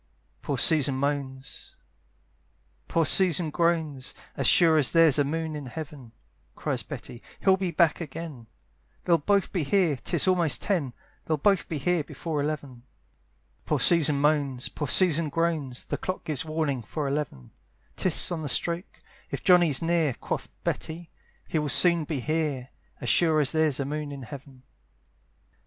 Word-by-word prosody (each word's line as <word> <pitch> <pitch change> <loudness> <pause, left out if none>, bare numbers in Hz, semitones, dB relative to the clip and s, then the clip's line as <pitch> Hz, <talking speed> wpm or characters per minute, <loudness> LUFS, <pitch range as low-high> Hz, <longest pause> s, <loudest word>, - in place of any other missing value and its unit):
Poor 140 - -3
Susan 140 -1 +4
moans, 135 -1 -5 1.1
poor 165 -1 +1
Susan 175 -2 +4
groans, 160 -6 -1 0.2
"As - - +1
sure 165 -3 +5
as 140 - +2
there's 165 -4 +4
a - - +4
moon 160 +2 -3
in 145 -3 -7
heaven," 140 -3 -9 0.4
Cries - - -2
Betty, 120 - -9 0.2
"he'll 190 -1 +4
be 190 -1 -3
back 170 0 +2
again; 155 -6 -8 0.6
"They'll 170 -2 +3
both 200 +5 +1
be 180 - 0
here, 170 0 +2
'tis 125 - -1
almost 175 -7 +2
ten, 165 -11 -1 0.3
"They'll 155 - 0
both 195 +5 +1
be 160 - -3
here 170 +3 0
before 150 +1 -4
eleven." 140 -4 -5 0.8
Poor - - -1
Susan 155 -4 +4
moans, 140 -4 0
poor 150 - -5
Susan 165 0 +4
groans, 155 -5 -2
The - - -3
clock 185 - -5
gives 150 -4 -3
warning 155 -5 -2
for 145 +5 -4
eleven; 135 - -4 0.4
'Tis 185 0 +4
on 170 -2 -3
the 150 - -4
stroke 170 +6 -2 0.3
"If - - -6
Johnny's 175 -6 +4
near," 165 -6 +1
Quoth - - -5
Betty 165 +1 -4 0.4
"he 160 - -1
will 150 -1 -2
soon 170 +3 +4
be 145 -4 -3
here, 150 -4 -2 0.3
"As 120 - -3
sure 160 +3 +3
as 145 -3 +3
there's 155 -4 +1
a 140 - -1
moon 150 +1 -4
in 140 -2 -8
heaven." 130 +1 -11
155 Hz, 155 wpm, -26 LUFS, 140-170 Hz, 1.1 s, sure